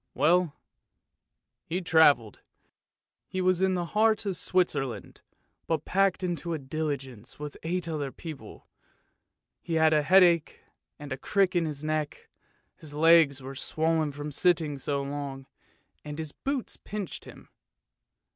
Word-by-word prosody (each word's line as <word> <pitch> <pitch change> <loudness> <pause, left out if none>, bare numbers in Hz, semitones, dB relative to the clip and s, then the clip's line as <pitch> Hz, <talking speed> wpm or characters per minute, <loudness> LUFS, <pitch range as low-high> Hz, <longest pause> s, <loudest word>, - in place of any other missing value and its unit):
Well, 170 0 +3 1.1
he 175 +3 -2
travelled. 160 - +4 0.9
He 185 - -4
was 185 -1 +2
in 190 -1 +2
the 175 -1 -1
heart 215 +3 +2
of 195 -2 -1
Switzerland, 140 - -1 0.5
but 160 -2 -1
packed 195 -1 +1
into 175 -1 -2
a - - -2
diligence 135 -5 -5
with 150 0 -7
eight 170 +1 -2
other 150 -4 -3
people. 155 -2 -10 0.9
He 165 - -3
had 160 0 +4
a 150 - +4
headache 175 -1 +4 0.4
and 145 -1 -9
a 135 - -2
crick 195 +5 +1
in 170 -1 +2
his 150 -1 -6
neck, 155 -1 -3 0.5
his 145 -2 -10
legs 155 -4 +5
were 135 +1 -7
swollen 160 +2 0
from 145 +1 -6
sitting 160 -3 +1
so 140 +1 -2
long, 140 -1 -5 0.6
and 150 0 -7
his 160 -2 -5
boots 275 - -4
pinched 205 -4 -6
him. - - -14
160 Hz, 135 wpm, -28 LUFS, 145-180 Hz, 1.1 s, legs